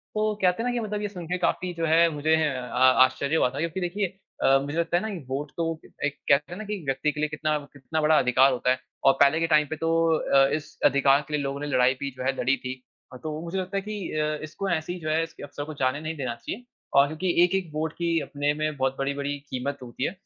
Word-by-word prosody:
तो 215 0 +1
कहते 180 +4 +2
है 245 - -1
ना - - -1
कि 245 - 0
मतलब 210 -2 -3
ये 210 - -1
सुन 180 -4 -8
के 180 +1 -1
काफ़ी 180 +1 -1
जो 165 -1 -2
है 165 +1 +5
मुझे 155 +2 +2
अ 130 -2 +2
आश्चर्य 140 +4 -2
हुआ 125 - +3
था 135 - -6
क्योंकि 170 +3 -2
देखिए 195 +3 -1 0.4
अ, 135 0 +5
मुझे 145 +4 -4
लगता 170 +1 +1
है - - 0
ना 220 - -2
कि 195 - -5
वोट 140 +2 -3
तो 165 -1 -1 0.3
एक 145 0 -1
कहते 140 +3 +3
हैं 175 - -6
ना - - -4
कि 205 -3 -4
व्यक्ति 135 +2 0
के 150 - -8
लिए 155 0 0
कितना 150 0 -1 0.2
कितना 145 +3 -3
बड़ा 155 0 +4
अधिकार 130 +2 +4
होता 125 0 +1
है। 130 - +1 0.3
और 135 - +8
पहले 140 +3 +5
के 165 - +1
टाइम 150 -2 +4
पे 160 - -2
तो 165 +1 -1 0.3
अ, 135 0 +4
इस 155 -1 -4
अधिकार 140 +1 +5
के 150 - -8
लिए 150 - +1
लोगों 140 +1 -3
ने 145 - -4
लड़ाई 130 -1 +3
भी 140 -1 -3
जो - - -4
है 135 +1 0
लड़ी 130 +2 +3
थी। 130 0 -6 0.4
तो 155 0 -4
मुझे 170 +3 -4
लगता 190 +1 -2
है - - 0
कि 205 -2 -5
अ, 155 0 -1
इसको 155 +6 -4
ऐसी 175 +1 -2
जो 155 -1 -4
है 160 +1 +2
इस 165 - -8
अवसर 145 0 -6
को 155 - -7
जाने 130 0 0
नहीं 160 +1 -4
देना 130 -4 -3
चाहिए। 215 - -7 0.3
और 140 +1 +7
क्योंकि 160 +5 -3
1-1 180 -1 +1
वोट 155 +1 -2
की 170 -1 +1
अपने 145 0 -1
में 155 0 -2
बहुत 135 0 0
बड़ी-बड़ी 140 +1 -2
कीमत 140 +2 -3
होती 120 +1 -6
है। - - +1
155 Hz, 265 wpm, -26 LUFS, 140-170 Hz, 0.4 s, और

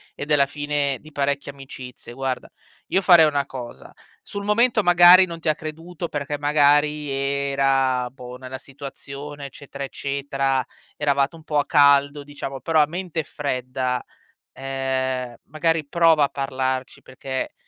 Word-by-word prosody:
e - - -5
della 145 -2 +4
fine 145 -1 -1
di 155 - -15
parecchie 140 0 -1
amicizie. 130 -3 -11
Guarda, 130 0 -4 0.4
io 190 - +1
farei 175 -4 +7
una 145 -2 +1
cosa. 125 -3 -9 0.3
Sul 200 0 -7
momento 230 +2 +3
magari 175 +1 +8
non 170 -2 -8
ti 160 - -1
ha 155 - +2
creduto, 165 +3 -7
perché 145 -1 -4
magari 145 0 +3
era, 135 -2 +1
boh, 125 -2 -10
nella 130 0 -7
situazione, 140 +1 -9
eccetera, 140 0 -9
eccetera; 135 -1 -1 0.3
eravate 140 0 +1
un 160 - -14
po' 150 -1 -2
a 145 - +2
caldo, 140 0 +4
diciamo, 140 -2 -7
però 160 +4 +2
a 150 - +3
mente 170 -1 -4
fredda, 130 -3 -3 0.5
ehm, 130 -2 -3
magari 160 0 0
prova 165 -1 +4
a - - -5
parlarci 130 -1 -3
perché, 130 0 -5
140 Hz, 145 wpm, -23 LUFS, 135-150 Hz, 0.5 s, magari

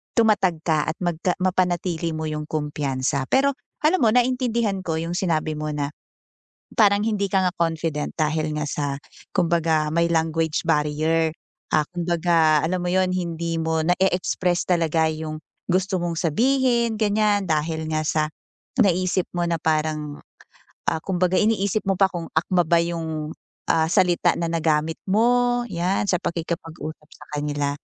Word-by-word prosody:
tumatag 210 -7 +3
ka 155 -3 +2
at 165 - -4
magka 175 +1 0
mapanatili 180 -2 0
mo 160 0 -3
'yung 150 0 -4
kumpiyansa. 140 -3 -1
Pero 275 +1 +3 0.3
alam 315 +2 +3
mo - - +5
naintindihan 240 -5 +1
ko 160 -1 -1
'yung 165 +1 -3
sinabi 160 -4 0
mo 155 0 -3
na, 145 -1 -2 0.9
parang 205 -2 +5
hindi 210 -3 0
ka 195 - +3
nga 180 - -2
confident 160 -3 -1
dahil 155 0 0
nga 150 - -1
sa 145 - -2 0.5
kumbaga 165 -4 +2
may 170 0 +2
language 160 -1 0
barrier, 160 +1 +2 0.5
ah, 155 -1 +3
kumbaga 170 -3 +2
alam 180 +2 -1
mo 175 - -1
'yun, 185 0 +2
hindi 170 -2 -2
mo 160 0 0
na-e-express 180 0 +1
talaga 165 -2 +2
'yung 155 0 -5 0.3
gusto 190 +1 +1
mong 170 -1 -2
sabihin 235 - +2
ganiyan, 210 -1 +2
dahil 160 0 -1
nga 155 0 0
sa 155 0 +1 0.6
naisip 185 -3 +2
mo 175 - 0
na 170 -1 0
parang 155 -1 -1 0.7
ah, 160 - -1
kumbaga 185 -1 +1
iniisip 210 -1 +1
mo 195 - +2
pa 195 - +6
kung 170 -2 -5
akma 175 +3 +2
ba 170 +1 +3
'yung, 160 -2 -3 0.4
ah, 160 -1 +3
salita 175 -1 +3
na 170 - 0
nagamit 160 -1 0
mo 245 +4 +3
'yan, 185 +2 -1
sa 190 - +2
pakikipag-usap 160 -2 -5
sa 150 - -14
kanila, 145 -1 -1
170 Hz, 150 wpm, -23 LUFS, 155-190 Hz, 0.9 s, pa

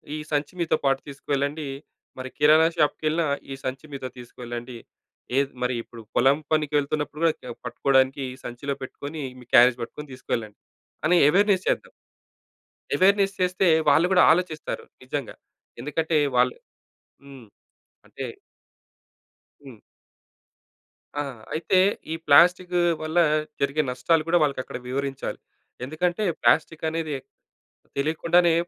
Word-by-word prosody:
ఈ - - -3
సంచి 145 +3 -1
మీతో 165 -2 +1
పాటు 135 -1 +2
తీసుకెళ్ళండి. 140 +1 -3 0.5
మరి 130 0 -6
కిరాణా 155 +2 +6
షాపుకెళ్ళినా 155 +1 +1 0.3
ఈ 135 - -3
సంచి 130 +2 -4
మీతో 130 -2 -5
తీసుకెళ్ళండి. 120 0 -8 0.6
ఏ - - +6 0.2
మరి 125 0 0
ఇప్పుడు 115 -1 -12
పొలం 135 +3 +4 0.2
పనికి 150 -1 0
వెళ్తున్నప్పుడు 150 +1 -2
కూడా 155 -7 0
పట్టుకోడానికి 135 +2 +2
ఈ - - -11
సంచిలో 135 +4 -4
పెట్టుకొని 145 +4 -7 0.2
మీ 125 - -14
క్యారేజ్ 120 +1 +7
పట్టుకొని 145 +4 -7
తీసుకెళ్ళండి 115 -4 -4 0.5
అని 180 +1 +4
అవేర్‌నెస్ 195 +2 +3
చేద్దాం. - - -1 1.0
అవేర్‌నెస్ 195 +1 +3
చేస్తే 180 0 +2 0.2
వాళ్ళు 165 +5 +4
కూడా 180 - +6
ఆలోచిస్తారు. 165 -2 -3 0.2
నిజంగా 135 -1 -5 0.5
ఎందుకంటే 155 +3 0 0.2
వాళ్ళు 125 0 +3 0.7
హ్మ్. 135 -5 -12 0.6
అంటే - - -7 1.4
హ్మ్. 120 -5 -12 1.4
ఆహ్, 135 -5 -4
అయితే 170 +4 +1 0.4
ఈ - - -1
ప్లాస్టిక్ 180 +4 +5 0.3
వల్ల 155 +2 -3 0.4
జరిగే 140 +2 +1
నష్టాలు 155 +6 +1
కూడా 175 +1 +4
వాళ్ళకి 140 -3 0
అక్కడ - - -7
వివరించాలి. 135 +1 -3 0.4
ఎందుకంటే 175 +8 -1 0.2
ప్లాస్టిక్ 155 +7 +2
అనేది 160 -2 -3 0.8
తెలియకుండానే 165 +4 +3
145 Hz, 115 wpm, -25 LUFS, 130-165 Hz, 1.4 s, క్యారేజ్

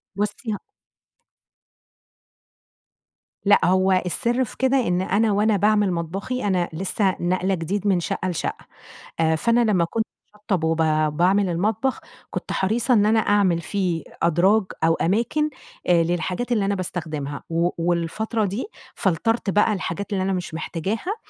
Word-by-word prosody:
بُصي 210 +4 -2
ه 205 - -5 2.8
لأ، 205 - +5
هو 185 +1 +3
السر 240 +7 0
في 245 - -8
كده 265 +1 +2
إن 180 +1 +1
أنا 205 +4 +2
وأنا 210 +1 +2
باعمِل 210 -1 +3
مطبخي، 190 +9 -3
أنا 180 -3 +1
لسه 190 +3 0
ناقلة 185 +2 0
جديد 190 +4 -2
من 190 -3 +3
شَقّة 185 +2 -2
لشَقّة، 175 - -4 0.5
آآ 160 0 +3
فأنا 235 +8 +2
لمّا 175 -4 +3
كنت 220 +6 -2 0.3
باشطَّب 205 -5 -2
وب 160 0 +1 0.4
باعمل 190 +2 +3
المطبخ، 210 +9 0 0.3
كنت - - -5
حريصة 230 +6 +1
إن 210 -3 +4
أنا 220 +1 +4
أعمل 200 -5 +2
فيه 180 -2 -2 0.2
أدراج 180 +6 +4 0.2
أو 165 0 +4
أماكن 235 - +1 0.4
آآ 170 -2 +4
للحاجات 175 +8 -2
اللي 215 -4 +2
أنا 200 0 0
باستخدِمها، 155 -6 -4
و 170 +1 +1
والفترة 175 +6 -1
دي 200 +6 -3 0.3
فلترت 205 +4 0
بقى 210 +2 +3
الحاجات 200 +1 -4
اللي 190 -1 0
أنا 195 0 0
مش 180 -3 -4
محتاجاها، 195 - -3
195 Hz, 145 wpm, -23 LUFS, 175-215 Hz, 2.8 s, لأ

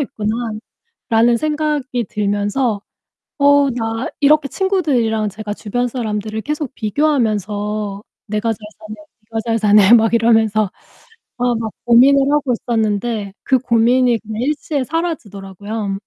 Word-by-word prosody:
있구나.'라는 225 -3 -4 0.6
생각이 300 -4 -1
들면서 205 +2 -1 0.6
'어 285 -1 +4
나' 225 0 -3
이렇게 290 0 +4
친구들이랑 260 - 0
제가 210 0 -6
주변 245 +4 -2
사람들을 220 -3 -4
계속 295 -2 -4
비교하면서 210 -5 -1 0.3
'내가 215 +2 -1
잘 220 - -9 0.2
사네, 215 0 -9 0.4
네가 225 - -3
잘 230 0 +1
사네.' 210 0 +5
막 225 0 +2
이러면서 220 -3 +3 0.7
아 245 0 +1
막 220 -2 -4
고민을 270 +4 +5
하고 290 -4 +1
있었는데 220 -2 -1
그 260 -1 +3
고민이 240 0 +2
그냥 220 +2 -5
일시에 290 -1 -1
사라지더라고요. 205 - -4
230 Hz, 290 characters per minute, -18 LUFS, 210-265 Hz, 0.7 s, 사네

